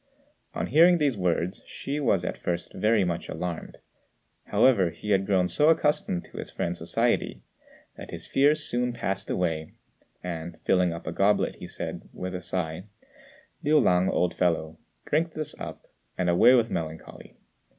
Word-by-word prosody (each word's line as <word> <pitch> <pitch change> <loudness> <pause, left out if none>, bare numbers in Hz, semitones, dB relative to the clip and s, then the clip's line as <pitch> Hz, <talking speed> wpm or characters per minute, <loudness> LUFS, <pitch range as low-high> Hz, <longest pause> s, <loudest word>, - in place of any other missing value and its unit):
On - - -1
hearing 170 +6 +6
these 145 -5 +1
words, 90 -1 -1
Hsü 145 +2 -4
was 95 -8 +2
at - - -4
first 85 0 -3
very 110 -1 +2
much 85 -2 -3
alarmed; 90 -2 -5 0.7
however, 100 -9 +4
he 85 +6 -6
had 95 -1 +2
grown 95 -3 +3
so 150 - +3
accustomed 150 - +1
to - - -14
his - - -6
friend's 85 0 -3
society, - - 0 0.5
that - - -9
his - - -7
fears 150 +3 +3
soon 125 -1 -1
passed 95 -4 -3
away; 80 -3 -2 0.5
and, 85 -1 -6
filling 90 -2 +2
up 85 0 -7
a 80 - -3
goblet, 100 +4 +1
he - - -8
said, - - -6
with 90 0 -5
a 90 - -4
sigh, 85 0 -3 0.8
"Liu 150 +1 +4
lang, 90 -7 +3
old 90 -1 +1
fellow, 80 -3 0 0.3
drink 160 +2 0
this 155 -2 -4
up, - - -8 0.3
and 90 -1 +1
away 120 +9 +6
with 115 -2 +2
melancholy. 80 -1 -6
90 Hz, 160 wpm, -27 LUFS, 85-125 Hz, 0.8 s, hearing